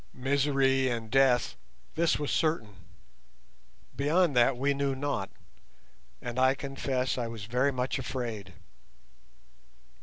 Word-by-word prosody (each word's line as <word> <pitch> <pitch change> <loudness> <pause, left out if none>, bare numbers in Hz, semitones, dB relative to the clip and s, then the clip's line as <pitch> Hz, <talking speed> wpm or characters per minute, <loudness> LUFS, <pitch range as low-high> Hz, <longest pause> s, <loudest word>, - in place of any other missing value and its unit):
Misery 135 0 +2
and 115 -2 -4
death, 135 -2 +3 0.4
this 165 0 +2
was 145 -1 -3
certain; 155 -10 0 1.2
beyond 150 +2 +2
that 120 +1 +4
we 140 +3 +1
knew 140 -1 -1
not, 135 -8 -2 0.9
and 120 +1 -3
I 130 +1 +4
confess 135 -2 -2
I 120 - -2
was 115 -3 -7
very 125 +5 +1
much 130 +1 -2
afraid. 115 -8 -5
130 Hz, 115 wpm, -29 LUFS, 120-140 Hz, 1.2 s, that